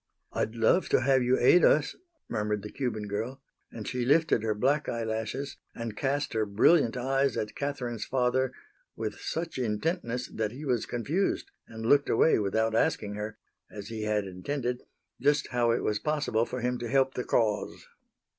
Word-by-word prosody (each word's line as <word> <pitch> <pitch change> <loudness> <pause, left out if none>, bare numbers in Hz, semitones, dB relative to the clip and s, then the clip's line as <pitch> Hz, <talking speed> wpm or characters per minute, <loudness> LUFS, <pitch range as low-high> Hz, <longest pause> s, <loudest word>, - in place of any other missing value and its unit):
"I'd 110 - -1
love 115 +11 +3
to - - +3
have 130 0 +3
you 125 +1 +3
aid 160 +7 +5
us," 145 -1 +4 0.3
murmured 105 -2 -2
the 105 - -7
Cuban 115 -6 -3
girl. 115 +6 -3 0.3
And 110 -2 -7
she 125 -1 -1
lifted 150 -1 +3
her 110 -1 0
black 140 +7 +1
eyelashes 115 +4 -3 0.2
and 115 -2 -5
cast 140 +5 -1
her 110 -1 +1
brilliant 115 +5 +4
eyes 135 0 +1
at 105 0 -3
Catherine's 125 -6 -3
father 130 0 +1 0.4
with 110 -1 -4
such 165 -4 -4
intentness 125 - -1
that 110 0 -3
he 145 +4 -8
was 125 -5 0
confused 150 - -1 0.2
and 110 0 -7
looked 140 +4 +4
away 160 - +4
without 110 +2 +1
asking 105 -2 +1
her, 105 +1 -5 0.3
as 105 0 -8
he 110 -1 -5
had 105 -1 0
intended, 120 +7 -3 0.4
just 145 +2 +2
how 120 -1 +1
it 115 - +1
was 105 -1 0
possible 140 -4 0
for 125 - -4
him 125 0 -1
to 120 - -4
help 135 +1 +3
the 125 - -3
cause. 110 -4 0
120 Hz, 175 wpm, -29 LUFS, 110-135 Hz, 0.4 s, aid